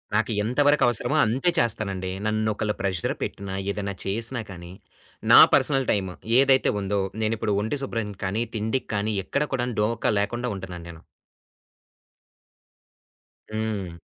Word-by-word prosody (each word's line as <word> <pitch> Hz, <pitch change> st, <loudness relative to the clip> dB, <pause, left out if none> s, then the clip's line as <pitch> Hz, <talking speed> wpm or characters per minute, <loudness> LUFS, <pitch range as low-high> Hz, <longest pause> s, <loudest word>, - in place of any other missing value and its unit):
నాకెంత 110 Hz, +4 st, 0 dB
వరకవసరమో 140 Hz, 0 st, +2 dB
అంతే 130 Hz, +11 st, +1 dB
చేస్తానండి. 100 Hz, -5 st, 0 dB
నన్నొకళ్ళు 110 Hz, -1 st, 0 dB
ప్రెషర్ 95 Hz, -4 st, -1 dB
పెట్టిన, 100 Hz, 0 st, -5 dB, 0.2 s
ఏదైనా 100 Hz, -1 st, -3 dB
చేసినా 115 Hz, +5 st, -2 dB
కానీ, 85 Hz, -1 st, -9 dB, 0.6 s
నా -, -, +11 dB
పర్సనల్ 135 Hz, -2 st, +3 dB
టైమ్ 95 Hz, -3 st, -1 dB, 0.3 s
ఏదైతే 135 Hz, -1 st, +4 dB
ఉందో, 100 Hz, 0 st, -1 dB, 0.2 s
నేనిప్పుడు 110 Hz, -1 st, 0 dB
ఒంటి 110 Hz, +7 st, -2 dB
శుభ్రం 115 Hz, -5 st, -3 dB
కానీ, 105 Hz, +5 st, 0 dB
తిండికి 110 Hz, +4 st, -2 dB
కానీ 105 Hz, +2 st, 0 dB
ఎక్కడ 140 Hz, +9 st, 0 dB
కూడా 125 Hz, -2 st, 0 dB
డోకా 115 Hz, +1 st, +1 dB
లేకుండా 120 Hz, +4 st, -2 dB
ఉంటున్నాను 90 Hz, -3 st, -8 dB
నేను. 85 Hz, -1 st, -11 dB, 2.5 s
హ్మ్. 105 Hz, -6 st, -4 dB
110 Hz, 120 wpm, -25 LUFS, 100-120 Hz, 2.5 s, నా